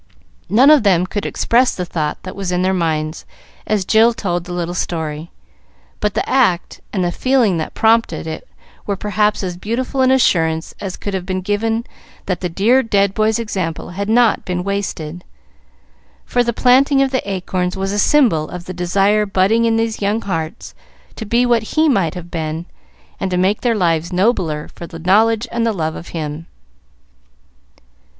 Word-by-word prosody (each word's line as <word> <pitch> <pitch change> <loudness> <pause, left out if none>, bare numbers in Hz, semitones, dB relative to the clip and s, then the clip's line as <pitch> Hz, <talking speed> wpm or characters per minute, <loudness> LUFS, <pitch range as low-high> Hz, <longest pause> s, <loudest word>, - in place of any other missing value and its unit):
None 260 +7 +6
of 300 -3 +6
them 185 -4 +3
could 205 +2 -3
express 245 +2 +2
the 180 - -3
thought 155 -3 -2
that 185 - -7
was 195 -2 -3
in 180 0 0
their 190 +1 +2
minds 160 -3 -1 0.4
as 210 -3 0
Jill 225 +3 +4
told 175 -4 -2
the 180 - -8
little 175 -1 -3
story; 160 -2 -3 0.7
but 210 -1 -1
the - - -1
act 230 -10 +1
and 190 -3 -1
the 175 - 0
feeling 245 -5 +2
that 155 - -5
prompted 225 -3 +2
it 160 0 -6 0.4
were 200 - 0
perhaps 210 +1 0
as 180 -2 -3
beautiful 250 +7 -2
an 260 - +4
assurance 165 -11 +2
as 190 -2 -5
could 200 - -5
have 185 -1 -3
been 185 -1 -2
given 225 +4 -1 0.4
that 180 -3 -2
the 180 - -2
dear 220 +10 +3
dead 200 -4 +1
boy's 215 +1 +1
example 190 -8 -4
had 200 +3 -4
not 235 0 +3
been 180 -1 -3
wasted, 180 -4 -4 1.0
for 245 - +1
the 235 - 0
planting 270 +4 +4
of 270 - -1
the 260 - 0
acorns 180 -1 -2
was 195 0 -2
a 205 - -1
symbol 215 - +3
of 180 -1 -8
the 185 - -6
desire 195 +4 +1
budding 195 +4 +2
in 225 -1 +2
those 225 -1 -1
young 205 +2 +1
hearts 165 -4 -4 0.4
to 220 - -7
be 235 +3 +2
what 235 -3 0
he 315 +1 +5
might 195 - +1
have 175 -1 -8
been, 160 0 -3 0.5
and 195 - -2
to 180 - -1
make 190 +3 +1
their 240 -2 +1
lives 170 -3 0
nobler 180 -6 0
for 170 - -9
the 165 - -9
knowledge 215 +7 +2
and 235 0 -1
the 230 - +2
love 160 -6 -2
of 170 - -9
him. 155 0 -5
195 Hz, 185 wpm, -18 LUFS, 175-225 Hz, 1.0 s, None